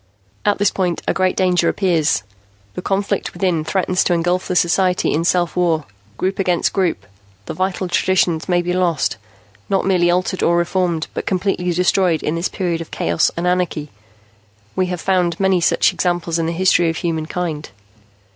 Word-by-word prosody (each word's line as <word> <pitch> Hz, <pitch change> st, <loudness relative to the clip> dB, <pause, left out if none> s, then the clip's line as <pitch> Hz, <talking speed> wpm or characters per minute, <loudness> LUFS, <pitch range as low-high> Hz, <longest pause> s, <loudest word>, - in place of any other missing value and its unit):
"At 205 Hz, -1 st, +2 dB
this 205 Hz, -1 st, +2 dB
point, 180 Hz, -3 st, -2 dB
a -, -, +2 dB
great 185 Hz, -1 st, +1 dB
danger 180 Hz, -2 st, +2 dB
appears. 165 Hz, -, +1 dB, 0.5 s
The -, -, -5 dB
conflict 195 Hz, +2 st, -1 dB
within 180 Hz, -5 st, 0 dB
threatens 185 Hz, +1 st, 0 dB
to 180 Hz, -, +2 dB
engulf 175 Hz, +2 st, 0 dB
the 180 Hz, -, -2 dB
society 180 Hz, +1 st, +2 dB
in 160 Hz, -, 0 dB
self 175 Hz, -1 st, +1 dB
war, 170 Hz, -4 st, +1 dB, 0.3 s
group 190 Hz, +1 st, -2 dB
against 180 Hz, -3 st, +1 dB
group. 185 Hz, -4 st, 0 dB, 0.4 s
The -, -, -5 dB
vital 185 Hz, 0 st, -2 dB
traditions 175 Hz, -2 st, +1 dB
may 175 Hz, -1 st, +2 dB
be 180 Hz, +1 st, -1 dB
lost 175 Hz, -9 st, 0 dB, 0.5 s
not 195 Hz, -, +1 dB
merely 180 Hz, -2 st, +3 dB
altered 185 Hz, +1 st, 0 dB
or 170 Hz, 0 st, +3 dB
reformed, 175 Hz, -2 st, 0 dB
but -, -, -5 dB
completely 185 Hz, -1 st, 0 dB
destroyed 180 Hz, -1 st, +2 dB
in 155 Hz, -, -1 dB
this 170 Hz, +2 st, -1 dB
period 175 Hz, -3 st, -2 dB
of 165 Hz, -, -8 dB
chaos 85 Hz, 0 st, +1 dB
and 170 Hz, -, -2 dB
anarchy. 180 Hz, -5 st, -1 dB, 0.8 s
We 185 Hz, -1 st, +1 dB
have 180 Hz, -1 st, -3 dB
found 180 Hz, -2 st, 0 dB
many 190 Hz, -2 st, +2 dB
such -, -, +3 dB
examples 175 Hz, -2 st, -1 dB
in 165 Hz, -, 0 dB
the -, -, -1 dB
history 175 Hz, -1 st, +3 dB
of 165 Hz, -, -4 dB
mankind. 160 Hz, -1 st, -3 dB
180 Hz, 175 wpm, -19 LUFS, 170-185 Hz, 0.8 s, merely